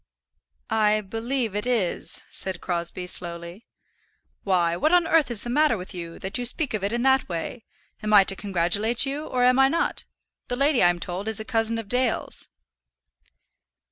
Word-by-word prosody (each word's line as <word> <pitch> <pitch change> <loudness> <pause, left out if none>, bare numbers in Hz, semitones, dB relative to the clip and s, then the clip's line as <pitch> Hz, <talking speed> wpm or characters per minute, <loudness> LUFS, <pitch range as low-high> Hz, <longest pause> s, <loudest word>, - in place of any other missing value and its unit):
"I 215 -1 +2
believe 225 +2 -3
it 210 +4 -2
is," 225 -8 -2
said 190 -2 -3
Crosbie, 175 0 -3
slowly. 170 +3 -3 0.8
"Why, 175 -3 +1
what 305 - +1
on 355 -1 +4
earth 325 -5 +3
is 230 -3 +2
the 240 - -5
matter 295 -3 +3
with 185 +2 -8
you, 170 -2 -7
that 190 +6 -4
you 245 - -2
speak 270 +3 0
of 210 -3 -2
it 200 - -1
in 240 +1 -1
that 265 -3 +3
way? 175 +7 -5 0.4
Am 215 - -3
I 205 -2 +8
to 195 - +1
congratulate 200 +6 +2
you, 285 +3 -4
or 250 -1 0
am 250 +1 +4
I 270 - +6
not? 330 +5 -1 0.4
The 245 - -2
lady, 275 0 +2
I'm 175 0 +3
told, 180 +3 -5
is 220 0 0
a 220 - -5
cousin 230 -1 +1
of 225 -2 -6
Dale's." 250 +1 -1
220 Hz, 180 wpm, -24 LUFS, 185-250 Hz, 0.8 s, I